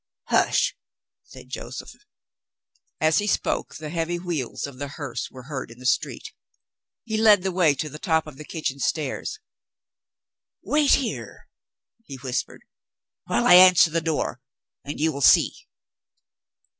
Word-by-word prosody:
"Hush!" - - +2 0.5
said - - -15
Joseph. - - -7 1.1
As 155 +3 +3
he 205 - -2
spoke, - - -1
the 155 -1 -7
heavy 170 +1 -2
wheels 170 -8 -4
of 140 -3 -10
the 145 - -4
hearse 140 -2 -6
were 130 -1 -12
heard 135 -2 -6
in 115 - -13
the 125 - -12
street. 130 - -1 0.7
He 220 -2 -3
led 215 -3 +5
the 190 - -1
way 170 -5 +3
to 155 - -3
the 150 +1 -9
top 160 -2 +1
of 150 -4 -11
the 155 - -8
kitchen 150 -3 -4
stairs. 150 - -2 1.3
"Wait 295 -1 +3
here," 265 -4 -5 0.6
he 140 - -9
whispered, 130 -1 -4 0.6
"while - - 0
I - - +7
answer 180 -2 +8
the 165 +1 0
door 155 -6 -2 0.4
and 145 - -6
you 160 +1 +2
will 140 -1 -6
see." - - +4
155 Hz, 145 wpm, -24 LUFS, 140-180 Hz, 1.3 s, answer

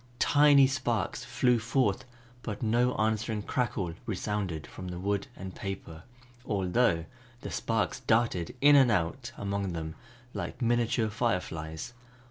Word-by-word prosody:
Tiny 145 0 +6
sparks 130 -4 -1
flew 125 -2 +2
forth 115 -2 0 0.4
but 105 -1 -5
no 120 +3 +2
answering 110 0 0
crackle 100 -9 -1
resounded 100 -6 -2
from 95 - -9
the 90 -1 -5
wood 100 +2 -1
and 95 -1 -7
paper, 95 -5 -6 0.4
although 100 -3 +1 0.4
the - - -6
sparks - - -1
darted 110 -6 +1
in 145 +1 +7
and 135 -3 +6
out 85 -7 -1
among 100 -2 -2
them 80 -1 -4 0.4
like - - -5
miniature 120 -2 +1
fireflies. 90 -4 -2
105 Hz, 125 wpm, -29 LUFS, 95-120 Hz, 0.4 s, in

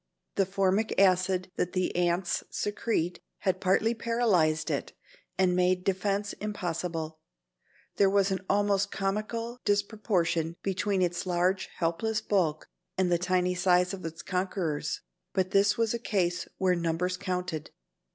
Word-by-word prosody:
The 195 -2 +1
formic 195 +2 +1
acid 185 -1 +3
that 180 - -1
the 185 -1 0
ants 175 0 +1
secrete 205 -4 -1 0.2
had 190 -2 0
partly 200 +4 +3
paralyzed 215 -10 +1
it - - -3 0.4
and 185 -1 +3
made 180 0 +2
defence 200 +2 0
impossible. 165 -5 -3 0.8
There 195 - +5
was 200 0 +3
an 190 -1 -2
almost 200 0 +2
comical 215 +5 -2
disproportion 195 -6 0
between 195 0 0
its 175 +1 -1
large 180 +2 +1
helpless 180 +7 0
bulk 165 -7 0 0.3
and 185 -1 +2
the 175 - +3
tiny 180 0 +1
size 180 0 +3
of 190 - -6
its 165 0 -6
conquerors, 180 -5 -2 0.3
but 185 -1 0
this 200 +1 +4
was 230 -1 +1
a 235 - -2
case 180 -6 0
where 185 -1 +3
numbers 170 +1 0
counted. 180 -4 -3
185 Hz, 135 wpm, -29 LUFS, 175-200 Hz, 0.8 s, There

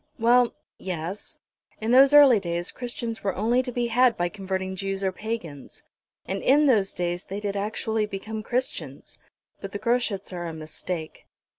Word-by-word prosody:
"Well 240 +1 +4 0.2
yes; 180 +2 -5 0.4
in 220 +2 -1
those 270 +2 +7
early 285 -6 +8
days 175 -2 -3
Christians 240 -2 -5
were 195 -2 -1
only 235 +5 +2
to 255 -1 -5
be 245 0 -1
had 245 +1 +4
by 175 0 0
converting 190 -1 -4
Jews 195 +1 -3
or 190 - +1
Pagans; 185 - -6 0.4
and 195 +1 -3
in 290 +3 +4
those 215 -8 +3
days 175 +1 -3
they 195 +2 -5
did 205 -1 -3
actually 215 +1 -1
become 215 +2 -5
Christians. 250 +4 -4 0.4
But 195 -1 -8
the - - -2
Groschuts 230 -6 -1
are 175 -1 -4
a 165 - -5
mistake." 160 +1 -6
205 Hz, 165 wpm, -25 LUFS, 185-240 Hz, 0.4 s, early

